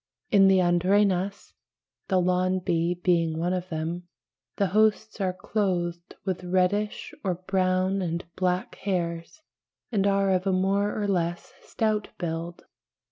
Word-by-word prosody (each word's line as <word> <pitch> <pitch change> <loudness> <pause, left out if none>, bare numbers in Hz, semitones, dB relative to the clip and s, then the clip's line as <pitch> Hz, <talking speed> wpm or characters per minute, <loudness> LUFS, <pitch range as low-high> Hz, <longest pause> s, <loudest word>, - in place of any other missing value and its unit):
In 195 -3 +6
the 190 0 +5
Andrenas 185 +2 +1 0.5
(the 190 -2 +2
lawn 185 +1 +2
bee 175 -1 0
being 170 -3 +1
one 175 +2 0
of 185 0 -3
them) 165 +2 -4 0.5
the 200 -2 +1
hosts 215 0 +2
are 185 -1 +1
clothed 180 -3 -2
with 185 -2 -2
reddish, 185 +4 0
or 185 -3 0
brown 185 +1 0
and 170 -1 -2
black, 180 0 -1
hairs, 175 - -3 0.5
and 200 -3 +2
are 195 -1 +2
of 185 +1 +1
a - - +3
more 195 +3 +1
or 205 - -1
less 175 -3 -1
stout 215 -2 -1
build 170 0 -4
(pl. - - -22
185 Hz, 140 wpm, -26 LUFS, 175-195 Hz, 0.5 s, In